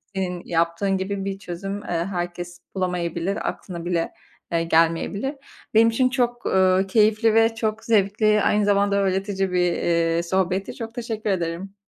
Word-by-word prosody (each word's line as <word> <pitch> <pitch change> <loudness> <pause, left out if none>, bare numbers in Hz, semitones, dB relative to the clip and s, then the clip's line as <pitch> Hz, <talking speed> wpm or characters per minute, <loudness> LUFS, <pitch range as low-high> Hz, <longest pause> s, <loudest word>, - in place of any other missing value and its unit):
Senin 180 -2 -2
yaptığın 170 +3 0
gibi 195 +1 -3
bir 195 0 -4
çözüm, 195 +2 -5
eee, - - -12
herkes 175 0 -3 0.2
bulamayabilir, 180 0 -1
aklına 175 -3 -7
bile, 170 -2 -1 0.4
eee, 165 -1 +1
gelmeyebilir. 165 - +1 0.4
Benim 225 +1 +6
için 255 +3 +2
çok, 240 -2 -1
eee, 190 0 +3
keyifli 215 +2 +3
ve 225 0 +4
çok 220 -1 -2
zevkli, 210 0 +3
aynı 210 +1 +2
zamanda 200 0 +2
öğretici 195 0 0
bir, 180 -1 +2
eee, 170 0 +1
sohbetti. 190 +2 -1
Çok 225 0 -7
teşekkür 225 -3 -3
ederim. 185 +1 -2
195 Hz, 145 wpm, -23 LUFS, 175-210 Hz, 0.4 s, Benim